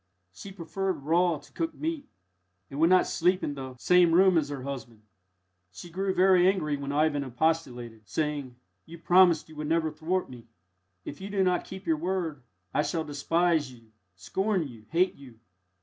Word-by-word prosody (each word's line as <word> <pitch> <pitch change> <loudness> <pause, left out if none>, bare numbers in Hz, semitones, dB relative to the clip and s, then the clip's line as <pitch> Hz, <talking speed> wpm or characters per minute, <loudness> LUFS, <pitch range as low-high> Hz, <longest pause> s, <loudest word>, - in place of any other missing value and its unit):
She 195 - -10
preferred 190 -3 -4
raw 170 +2 +2
to - - -18
cooked 330 -1 -3
meat, 315 -2 -4 0.6
and 140 - -6
would 165 +2 +5
not 185 0 +5
sleep 180 +2 +1
in 145 - -2
the 130 -2 -7
same 175 +4 +4
room 185 +1 +5
as 155 -3 +1
her 140 -3 -5
husband. 120 -5 -7 0.7
She 170 - -11
grew 190 +3 -1
very 185 -1 +4
angry 170 -6 +1
when 140 0 -5
Ivan 145 -1 +1
expostulated, 125 -5 -2
saying, 145 -5 -2 0.3
"You 170 +1 -10
promised 175 -1 +4
you 160 - -14
would 150 0 -4
never 160 0 +1
thwart 170 +5 -2
me. 120 -2 -12 0.6
If 145 - -8
you 195 - -6
do 200 -1 +1
not 180 -1 +1
keep 190 +1 -9
your 160 -1 +1
word, 170 -4 -3 0.3
I - - +2
shall 160 +1 -2
despise 155 0 0
you, 115 -3 -18 0.2
scorn 190 - -1
you, 115 -4 -14
hate 180 +3 +2
you." 125 -5 -15
160 Hz, 180 wpm, -28 LUFS, 140-185 Hz, 0.7 s, would